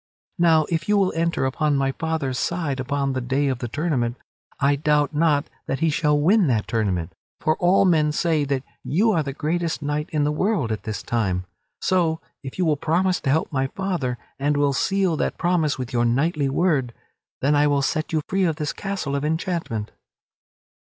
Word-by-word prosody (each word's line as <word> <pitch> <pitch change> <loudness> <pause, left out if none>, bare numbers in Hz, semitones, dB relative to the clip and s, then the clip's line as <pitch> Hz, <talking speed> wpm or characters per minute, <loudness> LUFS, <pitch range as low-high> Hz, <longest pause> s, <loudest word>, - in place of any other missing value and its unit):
Now 160 -3 +5
if 165 +1 -2
you 210 - +4
will 195 -2 +2
enter 165 -4 0
upon 145 +2 +1
my 135 0 +1
father's 140 -3 -2
side 160 -6 -1
upon 140 +1 -1
the 130 - -2
day 135 +3 0
of 130 -2 -2
the 120 - -3
tournament, 130 -3 -1 0.4
I 140 +1 +3
doubt 150 0 +1
not 150 -1 +2 0.2
that 135 - -1
he 165 -1 +3
shall 150 -1 +2
win 190 +5 +4
that 115 -5 +1
tournament; 95 -7 -1 0.3
for 155 - +1
all 185 +3 +4
men 155 -4 +3
say 155 -1 +1
that 135 -2 -1 0.2
you 210 +9 +2
are 165 - +2
the 140 -2 -3
greatest 160 +2 -2
knight 150 +2 -2
in 150 -2 +1
the 145 - +1
world 155 - 0
at 110 - -4
this 110 -2 -4
time. 95 -6 -1 0.4
So 170 -3 +1 0.2
if 135 -2 -8
you 185 - +1
will 155 -2 +2
promise 180 +5 +1
to - - -1
help 155 +4 +1
my 135 -2 0
father 170 -8 -2 0.2
and 145 +1 +1
will 145 -1 +2
seal 190 +3 +1
that - - -1
promise 170 -4 +1
with 130 0 -5
your 120 -1 +2
knightly 140 +4 +1
word, 135 -6 +1 0.5
then 140 +3 +3 0.2
will 145 - +2
I - - +1
set 155 +3 -1
you 155 -2 0
free 195 -1 +1
of 165 -3 +1
this 150 -1 -3
castle 195 -8 -3
of 140 - -2
enchantment." 160 - -2
150 Hz, 200 wpm, -23 LUFS, 135-165 Hz, 0.5 s, Now